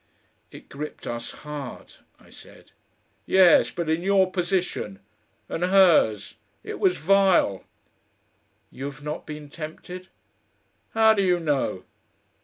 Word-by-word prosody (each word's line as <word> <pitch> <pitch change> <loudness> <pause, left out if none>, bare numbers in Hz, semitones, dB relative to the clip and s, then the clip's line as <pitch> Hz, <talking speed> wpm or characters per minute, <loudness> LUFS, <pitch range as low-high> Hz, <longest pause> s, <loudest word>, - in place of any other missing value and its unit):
"It - - -14
gripped 150 +2 -8
us 120 0 -5
hard," 150 -4 -9 0.3
I - - -21
said. - - -16 0.6
"Yes! 190 -2 +5
but 170 -2 -4
in 160 +2 0
your 190 0 +2
position! 175 - -2 0.5
And 165 - -4
hers! 175 - +3 0.3
It - - -7
was 380 -3 +2
vile!" 190 - +3 1.1
"You've 140 +1 -8
not 150 +1 -6
been 150 -1 -8
tempted." 175 +4 -8 0.9
"How 220 0 +6
do 205 - +1
you 180 -2 +2
know? 145 - -1
170 Hz, 115 wpm, -24 LUFS, 145-190 Hz, 1.1 s, How